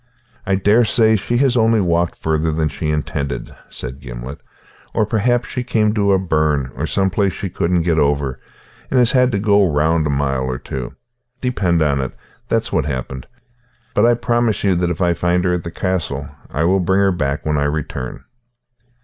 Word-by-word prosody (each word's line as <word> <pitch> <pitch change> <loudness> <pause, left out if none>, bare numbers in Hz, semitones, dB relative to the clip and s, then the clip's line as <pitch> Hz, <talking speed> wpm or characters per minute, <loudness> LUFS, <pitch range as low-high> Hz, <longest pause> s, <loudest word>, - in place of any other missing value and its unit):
"I 95 - +2
daresay 110 +3 +4
she 115 +4 -1
has 130 -1 +3
only 115 -1 +3
walked 85 -2 +1
farther 80 0 0
than 80 0 0
she 75 +1 -4
intended," 70 -2 -3
said 65 +1 -7
Gimblet, 60 +1 -8 0.6
"or 110 - +2
perhaps 120 +3 +1
she 125 - -4
came 110 -4 +1
to 100 -2 +2
a - - +4
burn 75 -7 0
or 75 +6 -2
some 95 +3 0
place 100 -1 +1
she 95 - -5
couldn't 85 0 0
get 80 -2 +1
over, 70 -3 0 0.5
and 130 - +1
has 125 -1 +5
had 125 -1 +3
to 100 - 0
go 100 0 +3
round 80 +2 +2
a - - -2
mile 70 -2 0
or 65 -1 -2
two. 65 0 -6 0.4
Depend 90 -10 +1
on 70 -2 +1
it, 65 - -5 0.3
that's - - 0
what's - - +1
happened. 65 -1 -5 0.7
But 110 +3 +4
I 120 - +4
promise 120 -2 0
you 100 -2 +3
that 90 0 0
if 90 - -2
she 90 - +1
is 85 0 -1
at 90 0 +1
the 85 - -5
castle 85 -8 -2 0.2
I 75 - -1
will 95 +3 +3
bring 95 +2 +2
her 100 -1 +3
back 75 -5 -2
when 75 -1 +1
I 70 - +1
return." 75 -4 -4
85 Hz, 190 wpm, -19 LUFS, 75-105 Hz, 0.7 s, has